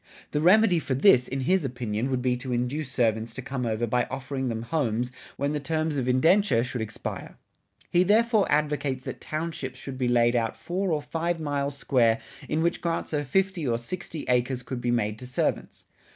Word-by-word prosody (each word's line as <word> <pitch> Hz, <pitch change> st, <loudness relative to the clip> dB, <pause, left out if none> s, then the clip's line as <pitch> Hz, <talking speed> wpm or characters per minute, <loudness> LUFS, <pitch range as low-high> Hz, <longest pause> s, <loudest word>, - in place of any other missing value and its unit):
The 150 Hz, -, 0 dB
remedy 185 Hz, +1 st, +5 dB
for 135 Hz, -4 st, -2 dB
this, 130 Hz, -4 st, +5 dB
in 135 Hz, +1 st, -3 dB
his 185 Hz, +6 st, +2 dB
opinion, 120 Hz, -2 st, -2 dB
would 130 Hz, -2 st, -1 dB
be 125 Hz, -1 st, +2 dB
to 125 Hz, +1 st, -6 dB
induce 125 Hz, +4 st, -2 dB
servants 115 Hz, -3 st, 0 dB
to 130 Hz, -, -4 dB
come 125 Hz, -2 st, -3 dB
over 110 Hz, +1 st, 0 dB
by 120 Hz, +2 st, +1 dB
offering 135 Hz, 0 st, -3 dB
them 115 Hz, -1 st, -3 dB
homes 125 Hz, -3 st, -1 dB, 0.3 s
when 140 Hz, +2 st, 0 dB
the 150 Hz, -, -1 dB
terms 155 Hz, +1 st, -1 dB
of 130 Hz, -2 st, -1 dB
indenture 130 Hz, -, +4 dB
should 125 Hz, -1 st, -4 dB
expire.[60:1] 110 Hz, -, -6 dB, 0.6 s
He 175 Hz, -, +4 dB
therefore 220 Hz, +2 st, +3 dB
advocates 145 Hz, -3 st, 0 dB
that -, -, -6 dB
townships 155 Hz, -4 st, -4 dB
should 135 Hz, -1 st, -7 dB
be 125 Hz, -, +1 dB
laid 120 Hz, 0 st, +3 dB
out 115 Hz, -2 st, 0 dB
four 185 Hz, +1 st, -2 dB
or 150 Hz, -2 st, 0 dB
five 165 Hz, +2 st, -2 dB
miles 145 Hz, -2 st, -2 dB
square 115 Hz, -5 st, +3 dB, 0.3 s
in 160 Hz, +1 st, +1 dB
which 170 Hz, -, 0 dB
grants 165 Hz, -1 st, -2 dB
of 145 Hz, -2 st, -1 dB
fifty 190 Hz, -1 st, +1 dB
or 115 Hz, -1 st, +1 dB
sixty 160 Hz, +5 st, -6 dB
acres 125 Hz, +1 st, +1 dB
could 125 Hz, 0 st, -5 dB
be 120 Hz, -, -1 dB
made 110 Hz, -3 st, 0 dB
to 125 Hz, -, -8 dB
servants. 125 Hz, -, -2 dB
135 Hz, 195 wpm, -26 LUFS, 120-160 Hz, 0.6 s, remedy